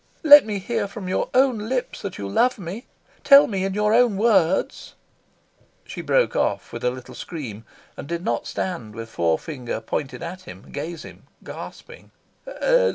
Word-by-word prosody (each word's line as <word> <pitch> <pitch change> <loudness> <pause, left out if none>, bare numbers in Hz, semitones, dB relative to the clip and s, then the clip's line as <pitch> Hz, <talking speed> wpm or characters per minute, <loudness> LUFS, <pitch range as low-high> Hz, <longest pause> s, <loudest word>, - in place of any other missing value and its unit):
Let 290 -5 +9
me 210 -2 -2
hear 205 +1 -2
from 200 -1 -8
your 185 - -1
own 250 -5 +2
lips 255 -1 -3
that 200 -2 -6
you 100 - -5
love 250 - +2
me. 195 +5 -7 0.4
Tell 280 0 +8
me 195 -3 -2
in 195 0 -3
your 210 +1 +2
own 235 -4 +4
words 195 -5 +1 0.5
" - - -38
She - - -7
broke - - +1
off - - -1
with - - -6
a 125 - +3
little 125 0 -9
scream, 115 -10 -7 0.3
and - - -8
did 170 +2 -4
not 120 - -1
stand 145 - -4
with 115 0 -7
forefinger 115 - -2
pointed 145 +3 -4
at 180 +2 -7
him, 95 +2 -12
gazing, 155 +3 -8 0.2
gasping. - - -10
185 Hz, 165 wpm, -23 LUFS, 135-220 Hz, 0.5 s, Let